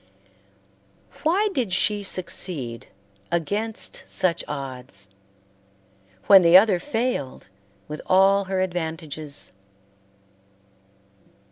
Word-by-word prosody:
Why 390 +7 +2
did 240 - -1
she 205 +3 +1
succeed 170 -10 -2 0.4
against 200 +4 -2
such 175 -3 +1
odds, 130 -8 -6 1.2
when 195 -1 +8
the 170 +1 +8
other 195 -2 +4
failed 225 - -3 0.4
with 150 0 -7
all 195 +1 +4
her 190 0 -1
advantages? 160 -4 -3
185 Hz, 80 wpm, -23 LUFS, 150-200 Hz, 1.2 s, when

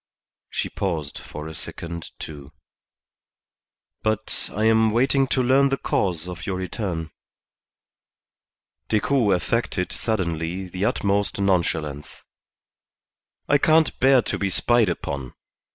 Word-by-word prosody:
She - - -2
paused 80 -7 -3
for 75 +1 -8
a 80 - -7
second, 85 +1 -7
too. 70 -2 -9 1.5
"But 110 0 -2
I 105 - -2
am 110 0 +5
waiting 135 +4 +3
to 130 0 +1
learn 135 +2 +4
the 135 - 0
cause 90 -8 -1
of 90 -2 -7
your 95 - -1
return." 90 -3 -3 1.8
Decoud 110 -2 +3
affected 90 -1 -1
suddenly 90 -3 -2
the 90 +2 -2
utmost 100 -2 0
nonchalance. 80 -6 -1 1.2
"I 145 - +4
can't 160 +1 +3
bear 130 -2 +5
to - - -2
be 100 - 0
spied 120 +2 +3
upon. 70 -6 -4
95 Hz, 115 wpm, -24 LUFS, 85-115 Hz, 1.8 s, am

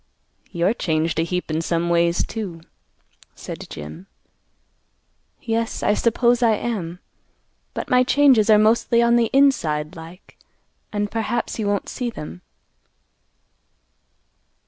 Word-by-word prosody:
"You're 175 +3 +1
changed 160 -5 -1
a - - +2
heap 180 0 -3
in 155 +1 0
some 170 +1 -1
ways, 170 0 +2
too," 190 -7 -6 0.7
said - - -8
Jim. 80 - -9 1.4
"Yes, 225 0 -2
I 205 - +3
suppose 235 +2 +2
I 225 -2 +4
am; 195 -7 -4 0.8
but - - -4
my 250 0 +4
changes 255 -5 +4
are 215 - +7
mostly 230 +2 +3
on 235 0 +4
the 235 -2 +2
inside 165 - +2
like; 165 +3 -13 0.5
and 205 -1 -2
perhaps 230 +1 -2
he 220 - -2
won't 205 0 -1
see 250 -2 -3
them." 150 - -9
205 Hz, 125 wpm, -22 LUFS, 170-235 Hz, 1.4 s, are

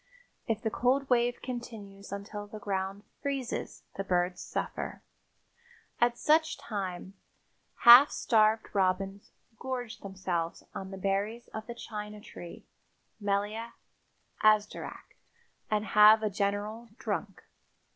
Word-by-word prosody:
If 225 -1 -1
the 220 - 0
cold 265 +4 +1
wave 240 0 +2
continues 215 -6 -7
until 205 +1 -6
the 215 - -8
ground 195 0 -3 0.2
freezes 275 -3 -3
the 195 - -1
birds 180 -1 0
suffer. - - -4 1.0
At 240 0 +3
such 315 +3 +3
times 195 -8 -5 0.6
half 245 +5 +10
starved 220 -1 +3
robins 195 +1 0 0.3
gorge 250 -3 -4
themselves 185 -4 -3
on 190 - -6
the 195 - -7
berries 200 +5 -2
of 220 0 -7
the 235 - -6
China 210 -2 -7
tree 175 -4 -11 0.5
(Melia 205 +3 -1 0.7
azederach) 215 -1 +1 0.5
and 215 0 +1
have 215 +1 +7
a 215 - 0
general 205 +3 -2
"drunk." 205 -6 -4
210 Hz, 115 wpm, -30 LUFS, 195-235 Hz, 1.0 s, half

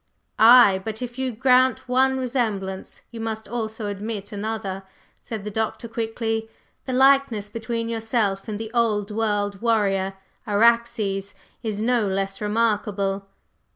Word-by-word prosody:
"Ay, 220 -4 +8
but 220 +3 -5
if 245 +1 -7
you 260 -1 -1
grant 255 +1 +3
one 265 +1 +3
resemblance, 220 -7 -3
you 230 - -8
must 220 -1 -4
also 220 -2 -4
admit 205 +1 -5
another," 205 -2 -4 0.4
said 220 -3 -6
the 210 - -5
Doctor 220 +2 -2
quickly. 225 0 -3 0.4
"The 260 - -2
likeness 265 -5 +3
between 230 +1 -3
yourself 225 -4 -1
and 210 -2 -3
the 225 0 -6
old 215 -3 +1
world 205 -2 -1
warrior, 195 -4 +1 0.3
Araxes, 215 -2 +2 0.3
is 215 -2 -3
no 235 -3 +2
less 195 +1 -2
remarkable!" 205 -2 0
220 Hz, 130 wpm, -23 LUFS, 205-235 Hz, 0.4 s, Ay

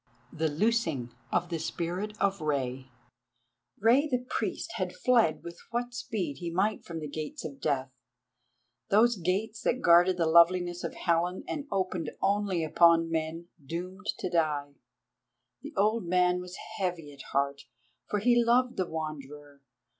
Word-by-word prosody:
THE 160 0 0
LOOSING 155 - 0 0.2
OF 175 0 0
THE 165 -2 -2
SPIRIT 185 +7 -4
OF 195 -3 +1
REI 130 -3 -2 0.9
Rei 245 +8 +4
the 255 -4 +1
Priest - - -3
had - - -3
fled 235 - +2
with 170 0 -9
what 240 +1 -2
speed 195 - -3
he 170 - -4
might 195 +5 0
from 165 -1 -6
the 155 - -5
Gates 155 +2 -6
of 140 -3 -8
Death, 135 -3 -1 1.0
those 230 +3 +5
gates 200 +5 -2
that 255 - +1
guarded 175 +2 +6
the 170 - +2
loveliness 175 +2 +4
of - - -4
Helen 175 +1 0
and 285 -1 -4
opened 185 -5 -1
only 200 -3 +1
upon 165 +1 +4
men 165 +1 -3
doomed 180 +7 -6
to - - -3
die. 150 -4 0 0.9
The - - -9
old 210 -1 +2
man 180 0 +3
was 180 +1 -9 0.2
heavy 175 -6 -3
at 140 - -12
heart, 140 0 0 0.4
for 210 - 0
he 240 +3 +4
loved 245 +2 +2
the 185 - 0
Wanderer. 145 -3 -7
175 Hz, 150 wpm, -29 LUFS, 155-205 Hz, 1.0 s, guarded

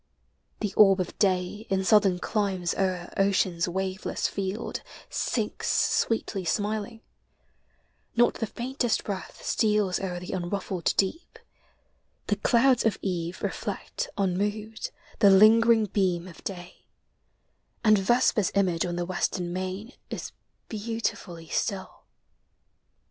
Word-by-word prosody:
The 210 -3 -2
orb 195 -2 +6
of 180 - -3
day 190 +2 0
In 190 -1 +1
southern 195 -2 +4
climes 190 -3 -1
o'er 185 -2 -2
ocean's 185 -3 +2
waveless 190 +2 -2
field 195 +3 -4 0.3
Sinks - - -2
sweetly 220 -3 +1
smiling: 215 +4 -2 1.1
not 240 +1 +4
the 225 - -3
faintest 245 +1 -1
breath 195 -3 -6
Steals 210 -4 +2
o'er 180 -2 -3
the 180 - -7
unruffled 185 -1 -2
deep; 265 - -1 0.9
the 205 - +1
clouds 245 +4 +3
oi 220 - +3
eve 175 -2 -3
Reflect - - -3
unmoved 205 +3 -1 0.3
the 205 -3 +7
lingering 220 +3 +6
beam 185 -3 0
ol 180 - -10
daj - - -18
J 180 -2 -9 1.1
\,,d 210 -2 +5
vesper's 220 -2 +3
image 180 -3 +2
on 175 - -3
the 175 0 -2
western 175 -1 -2
mam 185 +5 -4 0.2
Is - - -5 0.4
beautifully 205 -6 -4
still. 195 +2 -3
195 Hz, 115 wpm, -27 LUFS, 185-215 Hz, 1.1 s, the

